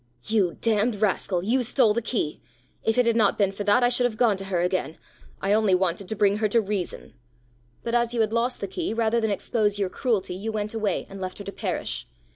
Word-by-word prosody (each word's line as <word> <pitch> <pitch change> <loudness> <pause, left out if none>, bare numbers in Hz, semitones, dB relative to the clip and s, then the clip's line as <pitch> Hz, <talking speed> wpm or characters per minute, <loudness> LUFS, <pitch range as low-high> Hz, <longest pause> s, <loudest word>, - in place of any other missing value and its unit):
"You 205 -6 +1
damned 225 0 +2
rascal, 195 -3 0
you 245 +6 +2
stole 245 -2 +3
the 235 - -1
key. 220 -9 -2 0.4
If 225 +1 0
it 250 - +4
had 230 -1 +2
not 215 -3 +3
been 200 -2 +2
for 195 +1 -5
that 210 +5 +4
I 245 - +5
should 245 0 +2
have 225 -3 -1
gone 225 -3 +3
to 195 - -6
her 190 -2 -1
again. 180 -3 -1 0.4
I 195 +1 +1
only 210 -3 +4
wanted 180 +1 -1
to 220 - -2
bring 205 -1 +3
her 215 0 +1
to 230 +3 +3
reason!" 200 -4 -4 0.7
"But 230 - -3
as 240 -1 +2
you 240 -2 +1
had 220 0 0
lost 240 +2 0
the 200 - -2
key, 330 - -3
rather 230 0 +1
than 220 - +1
expose 210 0 0
your 195 -2 0
cruelty, 210 -5 -1
you 205 +5 -4
went 215 0 -3
away, 220 -2 -1
and 195 0 -9
left 185 0 -4
her 205 - -7
to 200 - -6
perish! - - -4
215 Hz, 240 wpm, -25 LUFS, 195-230 Hz, 0.7 s, I